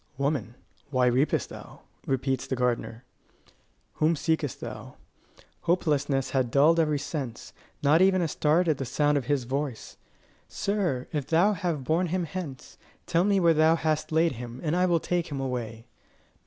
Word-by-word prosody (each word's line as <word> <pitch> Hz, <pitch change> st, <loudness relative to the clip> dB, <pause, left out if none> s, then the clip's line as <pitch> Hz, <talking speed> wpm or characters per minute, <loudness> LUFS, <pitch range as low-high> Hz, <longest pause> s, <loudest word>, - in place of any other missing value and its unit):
"Woman, 140 Hz, -5 st, -1 dB, 0.3 s
why 125 Hz, -3 st, +3 dB
weepest 130 Hz, +5 st, +1 dB
thou?" -, -, -11 dB, 0.3 s
repeats 135 Hz, 0 st, -1 dB
the 130 Hz, -, -1 dB
gardener. 120 Hz, -1 st, -2 dB, 0.9 s
"Whom 155 Hz, +2 st, +3 dB
seekest 150 Hz, -1 st, -1 dB
thou?" -, -, -8 dB, 0.7 s
Hopelessness 145 Hz, -6 st, +1 dB
had 130 Hz, -3 st, +1 dB
dulled 150 Hz, +6 st, +4 dB
every 155 Hz, -2 st, +2 dB
sense: 135 Hz, -5 st, -5 dB, 0.3 s
not 150 Hz, +4 st, +5 dB
even 190 Hz, 0 st, +4 dB
a 170 Hz, -, +1 dB
start 160 Hz, +4 st, +2 dB
at 155 Hz, -4 st, +1 dB
the -, -, -1 dB
sound 145 Hz, +4 st, +1 dB
of 140 Hz, -4 st, 0 dB
his 140 Hz, -2 st, 0 dB
voice! 135 Hz, -1 st, -4 dB, 0.5 s
"Sir, 185 Hz, -11 st, -1 dB
if 145 Hz, -4 st, -2 dB
thou 175 Hz, +6 st, +3 dB
have 165 Hz, -6 st, -2 dB
borne 165 Hz, +6 st, +1 dB
him 180 Hz, +2 st, -1 dB
hence, 160 Hz, -5 st, -7 dB, 0.3 s
tell 170 Hz, 0 st, +2 dB
me 200 Hz, 0 st, +3 dB
where 170 Hz, -2 st, +5 dB
thou 160 Hz, +1 st, +4 dB
hast 155 Hz, -2 st, -1 dB
laid 160 Hz, +1 st, +3 dB
him, 120 Hz, 0 st, -8 dB
and 155 Hz, 0 st, 0 dB
I 180 Hz, +1 st, +3 dB
will 170 Hz, -2 st, +2 dB
take 175 Hz, +1 st, -1 dB
him 140 Hz, -2 st, -5 dB
away." 120 Hz, -4 st, -4 dB
150 Hz, 165 wpm, -27 LUFS, 130-165 Hz, 0.9 s, not